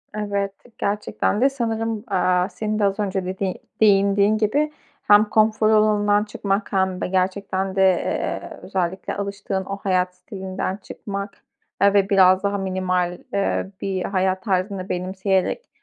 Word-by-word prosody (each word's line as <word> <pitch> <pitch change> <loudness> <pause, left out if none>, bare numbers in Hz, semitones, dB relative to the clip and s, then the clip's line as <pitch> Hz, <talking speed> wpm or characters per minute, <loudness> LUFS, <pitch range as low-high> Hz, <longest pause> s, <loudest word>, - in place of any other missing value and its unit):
Evet. 200 -2 -1 0.3
Gerçekten 205 +1 -1
de 270 - +5
sanırım, 225 -4 -2
aaa, 185 -2 +1
senin 215 +2 -3
de - - +1
az 195 +1 0
önce 195 -2 -1
dediği 190 0 -3 0.2
değindiğin 200 0 +4
gibi 285 +9 +1 0.3
hem 205 +1 +6
konfor 215 0 +2
alanından 210 -1 +3
çıkmak 205 -1 -2
hem 190 -1 +1
de - - -1
gerçekten 190 +1 -1
de, 195 - +2
eee, 190 -2 0
özellikle 185 0 -3
alıştığın 200 -1 -3
o 195 - -4
hayat 185 -2 0
stilinden 190 0 -5
çıkmak, 200 0 -7 0.4
aaa, 200 0 +4
ve 200 -1 +3
biraz 185 -1 +5
daha 200 0 0
minimal, 185 -2 -1 0.2
ııı, 195 -1 0
bir 190 -2 -2
hayat 185 -1 0
tarzını 190 -1 -1
benimseyerek, 190 - -1
195 Hz, 140 wpm, -22 LUFS, 185-210 Hz, 0.4 s, hem